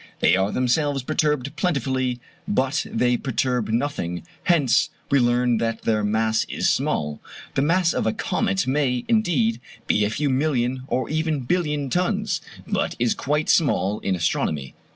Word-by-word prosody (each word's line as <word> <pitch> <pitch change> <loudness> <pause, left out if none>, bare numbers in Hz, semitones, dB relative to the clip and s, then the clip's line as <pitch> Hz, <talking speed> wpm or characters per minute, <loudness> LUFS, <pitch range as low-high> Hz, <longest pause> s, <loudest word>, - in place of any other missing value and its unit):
They 90 - +4
are 95 +2 +1
themselves 135 +2 +1
perturbed 150 -1 0
plentifully, 130 - 0 0.3
but 135 -10 0
they 125 +1 +1
perturb 125 -2 -1
nothing; 110 - -2 0.2
hence 150 -9 +3 0.2
we 140 - +5
learn 120 -1 +2
that 115 -1 -2
their 110 -2 +1
mass 110 +1 +1
is - - -1
small. 75 -1 0 0.3
The - - +1
mass 170 +4 +2
of - - -1
a - - +3
comet 95 -1 -1
may, 130 -2 0
indeed, 150 - +1 0.2
be 105 - +2
a 105 - +1
few 140 +5 -1
million 130 -2 0
or 130 - -1
even 155 -2 0
billion 150 -1 -1
tons; 185 0 0 0.2
but - - -1
that - - -15
is 120 -1 +2
quite 150 +2 -1
small 105 - +2
in 95 - -1
astronomy. 75 -5 -1
130 Hz, 155 wpm, -23 LUFS, 115-150 Hz, 0.3 s, we